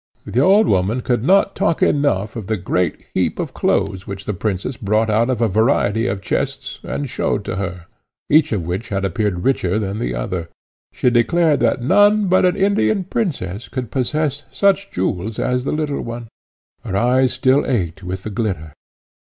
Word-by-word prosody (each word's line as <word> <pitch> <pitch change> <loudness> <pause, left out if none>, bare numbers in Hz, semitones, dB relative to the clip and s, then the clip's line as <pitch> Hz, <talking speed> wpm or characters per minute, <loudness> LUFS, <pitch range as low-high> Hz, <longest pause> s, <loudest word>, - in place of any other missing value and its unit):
The 105 +5 -1
old 195 +9 +5
woman 100 - +1
could 120 -2 0
not 195 +5 +3
talk 195 -5 +1
enough 110 -9 +1
of 110 -5 -6
the 110 0 0
great 90 -2 -1
heap - - 0
of - - -4
clothes 95 -1 0
which 100 0 -7
the 105 - -2
princess 100 +5 -3
brought 110 +1 0
out 115 +3 +2
of 125 -3 -1
a 115 - +4
variety 110 0 +2
of 95 0 -3
chests - - -3
and 145 - -4
showed 110 -3 -2
to 95 - -3
her, 90 -3 -4 0.4
each 155 0 +4
of 100 -6 -1
which 95 +7 -4
had 100 -1 -1
appeared 95 -1 -1
richer 105 -8 +1
than 105 -1 -2
the 90 - -2
other. 85 +8 -3 0.4
She 125 - +1
declared 150 +6 +3
that 120 - +1
none 205 - +4
but 185 0 +4
an 180 - +1
Indian 195 - +2
princess 140 - -3
could 125 -4 -5
possess 145 +2 -1
such 200 0 +1
jewels 95 +3 -2
as 125 0 -1
the - - -1
little 150 -2 -2
one; 115 -1 -7 0.5
her 95 - -2
eyes 125 +3 +3
still 130 +2 +3
ached 95 -8 -1
with 95 0 -5
the 110 - -5
glitter. 95 -9 -3
115 Hz, 185 wpm, -19 LUFS, 95-140 Hz, 0.5 s, old